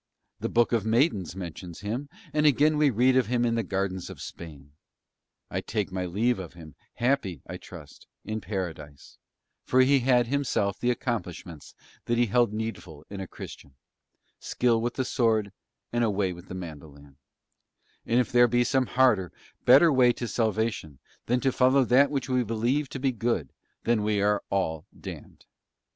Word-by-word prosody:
The - - -2
Book 120 0 +2
of 115 -4 +1
Maidens 110 - +1
mentions 90 -1 -8
him, 120 +8 -4 0.2
and 150 0 +3
again 150 +2 +4
we 150 -1 +4
read 125 +2 +3
of 130 -4 +3
him 120 0 +1
in 115 - +1
Gardens 95 -2 -2
of - - -10
Spain. 75 -4 -10 0.8
I - - -2
take 105 -4 -3
my 90 -1 -3
leave 110 +6 0
of 90 -3 -8
him, 80 -3 -12 0.2
happy, 120 - 0
I - - -7
trust, - - -13 0.2
in 110 0 -4
Paradise, 80 -7 -6 0.4
for 130 - +3
he 135 +2 +4
had 125 -1 +3
himself 115 -6 -1
the 125 - 0
accomplishments 100 - -4 0.3
that 120 - 0
he 120 - +4
held 120 0 +2
needful 105 -8 -6
in 100 - -6
a 95 - -5
Christian, 70 -4 -11 0.6
skill 120 -2 +1
with 120 +1 -2
the 130 - -1
sword 110 -5 +1 0.4
and 120 0 +1
a 115 - +2
way 95 -2 0
with 90 +2 -13
the 90 - -7
mandolin; 75 -5 -10 0.9
and 120 +2 +2
if 125 - 0
there 120 0 +6
be 120 +1 +2
some 130 0 +1
harder, 115 -9 +3 0.3
better 140 +6 +7
way 125 -2 +5
to 120 - -5
salvation 110 - -1 0.3
than 125 +1 +2
to 135 - +2
follow 130 +1 +4
that 135 +4 +5
which 135 -3 -2
we 130 -1 +1
believe 120 +6 -1
to 135 - -6
be 135 0 +1
good, 115 - -2 0.3
then 115 -1 +2
are - - -2
we 105 -1 +1 0.3
all 80 -5 -1
damned. - - -10
115 Hz, 175 wpm, -27 LUFS, 95-125 Hz, 0.9 s, better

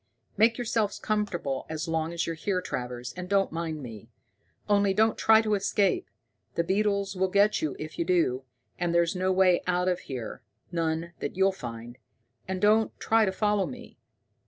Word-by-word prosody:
"Make 225 +3 +4
yourself 225 -4 -1
comfortable 185 -11 -2
as 160 +1 -4
long 160 0 -1
as 170 0 -1
you're 165 - -2
here, 185 +3 -1
Travers, 125 -6 -5
and 180 0 -7
don't 195 -1 +2
mind 160 -2 -4
me. 110 -5 -9 0.6
Only, 200 -1 +3
don't 220 +2 +3
try 220 0 +5
to 215 -1 0
escape. 205 - +1 0.5
The 170 - +1
beetles 200 +2 0
will 190 +1 +1
get 200 +3 +3
you 150 -3 -2
if 155 0 -8
you 170 - +1
do, 165 -8 +1 0.4
and 175 -1 0
there's 170 +1 +2
no 185 +1 +1
way 185 -1 +4
out 180 0 +1
of 180 -1 +1
here 125 -2 -6 0.3
none 165 0 -2
that - - -4
you'll 190 0 +4
find. 120 -7 -8 0.5
And 190 0 -2
don't 215 +2 +3
try 225 0 +3
to 190 - 0
follow 205 0 +1
me. 245 -2 -10
185 Hz, 180 wpm, -28 LUFS, 160-205 Hz, 0.6 s, try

